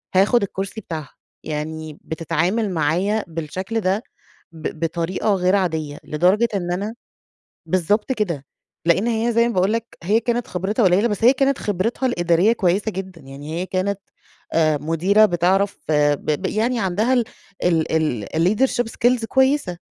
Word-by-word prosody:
هاخد 200 +4 +4
الكرسي 195 +2 -4
بتاعها، 160 -6 -7 0.3
يعني 155 0 -5
بتتعامل 170 +7 -1
معايا 180 +7 0
بالشكل 175 +7 -4
ده، 195 +4 0 0.5
ب 160 -1 -6
بطريقة 170 +5 -1
غير 185 +1 +2
عادية، 160 -6 -1
لدرجة 185 +9 +2
إن 175 -2 -2
أنا 205 +5 -3 0.7
بالضبط 205 +7 +1
كده، 170 - -2 0.4
لإن 180 +6 +3
هي 235 0 +1
زي 235 +1 +4
ما 235 - -2
باقول 190 +3 +2
لَك 230 0 -2 0.2
هي 210 +6 +3
كانت 240 +1 -1
خبرتها 195 +6 -1
قُليّلة 190 +4 +4
بس 205 +1 -3
هي 250 - +7
كانت 275 0 +1
خبرتها 210 +6 -1
الإدارية 175 -1 +3
كويسة 200 0 +1
جدًا، 190 -2 -7
يعني 145 +5 -6
هي - - -2
كانت 195 +1 -1 0.5
آآ 155 -2 +3
مديرة 180 +7 +3
بتعرف 190 +2 +1
ب 150 0 +2
ب - - -4
يعني 230 +4 0
عندها 205 +6 +1
ال 245 -2 +3 0.4
ال 160 - +1
الleadership 215 +8 +2
skills 245 -1 +1
كويسة، 265 -7 +1
185 Hz, 150 wpm, -21 LUFS, 165-220 Hz, 0.7 s, هي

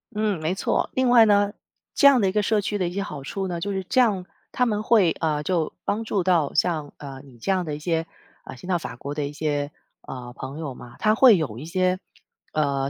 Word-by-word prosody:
嗯， 210 -4 0
没 160 +4 -1
错。 - - 0
另 260 -1 +1
外 235 -2 +7
呢， 205 -1 +3 0.4
这 280 - +6
样 270 -3 +6
的 200 - +2
一 185 - +1
个 210 - +1
社 210 0 +1
区 205 +1 -2
的 180 - 0
一 175 - -5
些 200 - -2
好 150 -8 -7
处 190 +6 -4
呢， 175 -2 -3
就 200 +4 -3
是 190 -1 -2
这 255 - +4
样， 200 -7 +1 0.3
他 250 - +1
们 210 -3 0
会， 215 -7 +4
呃， 150 -2 0
就 170 -3 0
帮 220 +3 -1
助 200 -4 -1
到， 170 -6 +2
像， 155 -5 0
呃， 135 -2 -9
你 130 -4 -16
这 155 - -2
样 185 -1 +1
的 155 -3 -4
一 - - -8
些， 165 +1 -1 0.4
呃， - - -8
先 180 - -11
到 180 -2 +1
法 140 - -7
国 140 +4 -6
的 145 -1 -2
一 145 - -7
些， 145 -1 -2 0.3
呃， 120 -2 -8
朋 135 +4 -7
友 145 -5 -4
嘛。 120 -1 -12
它 215 0 +3
会 235 -3 +7
有 120 -8 -3
一 150 - -8
些， 185 +2 0 0.5
呃， 140 -3 0
175 Hz, 265 characters per minute, -24 LUFS, 145-205 Hz, 0.5 s, 外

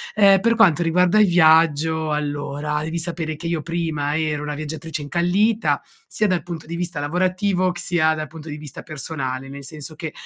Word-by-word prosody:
Ehm, 195 -2 +6
per 230 0 +3
quanto 175 -7 +4
riguarda 180 +5 +3
il 210 - +6
viaggio, 160 -2 +4
allora, 145 0 -2
devi 160 +2 -3
sapere 160 -2 -3
che 165 - -10
io 165 -2 -1
prima 160 -2 -2
ero 150 -2 -1
una 150 0 -4
viaggiatrice 155 0 -5
incallita 185 +8 +1 0.3
sia 215 - 0
dal 180 -4 +1
punto 170 -3 -7
di 170 +2 -6
vista 170 -3 -3
lavorativo, 185 +4 0
c 175 - -8
sia 160 -3 +2
dal 155 0 -4
punto 160 +1 -10
di 150 - -5
vista 150 -2 -9
personale, 135 -3 -5
nel 140 0 -9
senso 150 +2 -7
che 160 0 -5
160 Hz, 185 wpm, -22 LUFS, 150-175 Hz, 0.3 s, Ehm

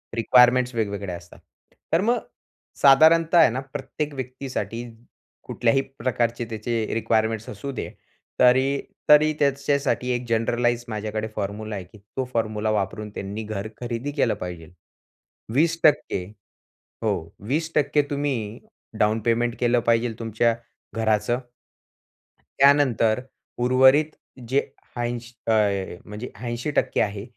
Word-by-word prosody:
Requirements 125 +2 +4
वेगवेगळ्या 100 -4 -2
असतात. 85 0 -16 0.5
तर 165 - +4
मग 235 +4 +2 0.6
साधारणतः 160 +5 +6
आहे 160 -7 +7
ना 125 - -3
प्रत्येक 145 +1 -4
व्यक्तीसाठी, 125 -4 -5 0.6
कुठल्याही 120 +3 +1 0.2
प्रकारचे 120 -1 -1
त्याचे 110 +1 -2
रिक्वायरमेंट्स 110 -1 0
असू 105 +7 -6
दे, 130 - -5 0.5
तरी 130 +2 +4 0.3
तरी, 150 +1 +7
त्याच्यासाठी 140 -2 +1
एक 125 0 -2
जनरलाइज 120 +1 +1
माझ्याकडे 110 0 -3
फॉर्म्युला 105 +1 -4
आहे 95 - -5
की 90 +4 -17 0.2
तो 130 - +1
फॉर्म्युला 110 -1 -1
वापरून 105 +1 -2
त्यांनी 100 +3 -5
घर 105 -1 -4
खरेदी 120 +4 -3
केलं 135 -6 +1
पाहिजेल. 90 -2 -7 0.8
20% 165 +3 +2
टक्के 145 -10 +3 0.8
हो, 110 -2 +2 0.3
20% 160 +4 -1
टक्के 145 0 +3
तुम्ही 130 -6 -2 0.4
डाउन 110 +1 +2
पेमेंट 120 0 +1
केलं 120 0 +3
पाहिजेल 115 -1 +1
तुमच्या 115 +1 +1 0.4
घराचं. 110 +1 +1 1.2
त्यानंतर, 130 -5 +4 0.4
उर्वरित 130 +5 +5 0.4
जे 135 +2 +3 0.4
ऐंश 120 0 -4 0.2
अ, - - +4 0.5
म्हणजे 105 +4 -7
80% 120 +4 -3
टक्के - - 0
आहे. 100 -1 -1
120 Hz, 120 wpm, -24 LUFS, 110-135 Hz, 1.2 s, आहे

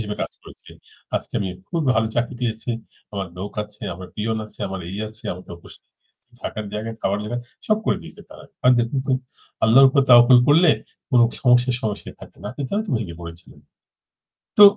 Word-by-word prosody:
হিসেবে 105 -1 -4
কাজ - - -4
করেছে। - - -15 0.5
আজকে - - -6
আমি 95 - -1 0.2
খুব 165 -2 -1
ভালো 110 0 +2
চাকরি 120 +2 0
পেয়েছি। 115 0 -2 0.4
আমার 100 -1 -3
লোক 100 +2 -5
আছে, 105 0 -14
আমার 90 +1 -9
পিয়ন 110 +1 -1
আছে, - - -16
আমার 95 -1 -5
এই 95 - -5
আছে। 110 0 -14
আমার 90 +1 -10
উপস্থিত - - -15 0.5
থাকার 110 - -4
জায়গায়, 110 +2 -4
খাবার 100 +1 +1
জায়গা 115 +3 -3 0.3
সব 215 0 +3
করে - - +3
দিয়েছে - - -12
তারা। - - -12 0.2
আর 125 - +7
দেখুন 120 +4 0
তো 135 - +1 0.5
আল্লাহর 125 +5 +8
উপর 140 +1 +3
তাওয়াক্কুল 120 +1 +9
করলে 160 +3 +7 0.4
কোন 125 - +5 0.2
সমস্যাই 125 0 +4
সমস্যায় 105 -2 -4
থাকে - - -13
না। - - -6
আপনি 140 - -5
তাও 205 - 0
তো - - -5
ভেঙ্গে 100 -7 -4
পড়েছিলনে? 85 0 -11 0.9
তো 210 - +10
110 Hz, 185 wpm, -22 LUFS, 105-125 Hz, 0.9 s, তো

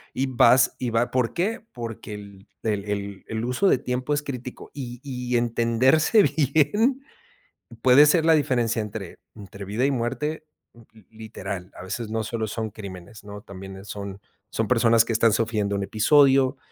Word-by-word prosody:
y 135 - 0
vas 125 -1 +4
y 125 -2 -2
va, 115 +2 +1
¿por 125 -3 0
qué? 220 +5 -2
Porque, 115 -3 -7
el 100 -1 -12 0.2
el 105 -3 -1
el 100 -1 -4
el 110 +1 -3
uso 125 +11 +1
de - - +4
tiempo 125 +3 -2
es 145 - -2
crítico 125 -3 -7
y 125 -3 -7
y 125 -3 -2
entenderse 120 - +3
bien, 160 - +2 0.8
puede 130 +4 +7
ser 160 +1 +3
la 165 - +5
diferencia 125 -7 +1
entre 105 -3 -7 0.2
entre 100 -1 -10
vida 105 +6 -1
y - - +1
muerte, 150 +6 -3 0.3
mm, 120 - -17
li 110 -4 -19
literal, 100 -4 -7
a - - -9
veces 110 +4 -5
no 110 0 -1
solo 115 -1 -3
son 110 +1 -4
crímenes, 100 -1 -10
¿no? 105 0 -9
También, 95 0 -10
eh, 95 - -12
son 100 -1 -7 0.3
son 110 -2 -1
personas 115 -2 +4
que 115 - -3
están 115 0 +3
sufriendo 105 -2 0
un 100 - -2
episodio, 135 +4 +4
115 Hz, 175 wpm, -24 LUFS, 105-130 Hz, 0.8 s, puede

